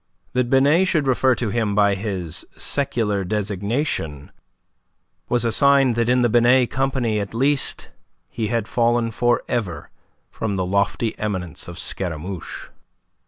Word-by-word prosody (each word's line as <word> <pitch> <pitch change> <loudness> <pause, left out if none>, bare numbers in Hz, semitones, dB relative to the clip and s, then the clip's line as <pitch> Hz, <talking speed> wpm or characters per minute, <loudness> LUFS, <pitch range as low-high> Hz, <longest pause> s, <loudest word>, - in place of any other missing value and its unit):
That 125 -1 0
Binet 145 +8 +4
should 155 -6 +1
refer 130 -1 +3
to 115 -4 -2
him 110 -3 0
by 100 -1 +4
his 95 -5 -3
secular 110 -8 -1
designation 100 - -2 1.0
was 120 -1 +1
a 115 - +1
sign 140 0 +4
that 115 +1 0
in 125 0 +3
the - - +4
Binet 120 +2 +4
company 130 -5 0
at 100 +2 -5
least 135 +3 +1 0.4
he 110 -2 -3
had 115 -1 -1
fallen 120 -1 +1
for 120 +2 +1
ever 95 -11 -3 0.4
from 105 -3 -3
the 95 -1 -1
lofty 100 +4 0
eminence 95 -6 -4
of 85 0 -8
Scaramouche. 90 0 -4
115 Hz, 140 wpm, -22 LUFS, 100-125 Hz, 1.0 s, Binet